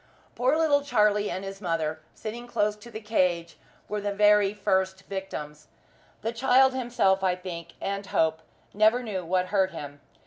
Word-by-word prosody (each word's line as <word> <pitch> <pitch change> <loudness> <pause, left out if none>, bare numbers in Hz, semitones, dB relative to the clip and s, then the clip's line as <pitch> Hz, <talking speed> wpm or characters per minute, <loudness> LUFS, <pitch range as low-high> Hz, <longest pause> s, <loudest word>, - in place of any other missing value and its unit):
Poor 260 +5 +2
little 300 -3 +3
Charlie 210 -6 +2
and 185 - -4
his 195 +1 -7
mother, 165 -4 -1 0.2
sitting 235 +3 -7
close 210 -3 0
to 210 +3 -13
the 220 - -7
cage, 180 -6 0 0.3
were 210 0 -3
the 205 0 -2
very 205 0 +4
first 190 -2 0
victims. 155 -6 -6 0.6
The 225 - -1
child 260 +2 +4
himself, 235 -7 +1
I 185 -1 +2
think, 170 -2 -8
and 200 0 -3
hope, 160 0 +1 0.3
never 220 +4 +3
knew 200 -5 -4
what 180 +2 0
hurt 190 -2 +3
him. 145 -5 -9
200 Hz, 165 wpm, -27 LUFS, 180-220 Hz, 0.6 s, very